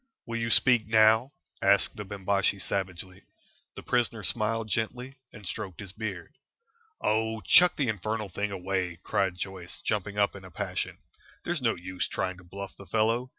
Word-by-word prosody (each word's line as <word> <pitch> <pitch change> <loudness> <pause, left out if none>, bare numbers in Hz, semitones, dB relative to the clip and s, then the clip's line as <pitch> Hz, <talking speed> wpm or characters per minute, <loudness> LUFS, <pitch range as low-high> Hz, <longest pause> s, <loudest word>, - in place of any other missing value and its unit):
"Will 115 0 -3
you 115 0 -1
speak 120 -1 +4
now?" 110 +3 +5 0.3
asked - - +4
the 105 - -5
Bimbashi, 100 0 +1
savagely. 95 -1 -3 0.5
The - - -8
prisoner 120 -3 +1
smiled 110 +4 0
gently 125 +5 -3
and 105 - -12
stroked 95 -1 -5
his 100 -3 -7
beard. 100 -5 -6 0.7
"Oh, 110 +1 +1
chuck 175 - +7
the 140 - 0
infernal 110 0 -2
thing 100 +4 -2
away!" 95 -2 -2
cried 95 -2 0
Joyce, 95 -2 -6
jumping 105 -1 -1
up 100 -1 +2
in 95 - -10
a 95 - -10
passion. 80 - -3 0.5
"There's 175 -4 -2
no 115 -2 +2
use 90 +1 -3
trying 95 -1 -2
to 90 - -14
bluff 100 +2 -8
the 100 - -13
fellow. 115 +5 +1
105 Hz, 165 wpm, -28 LUFS, 95-115 Hz, 0.7 s, chuck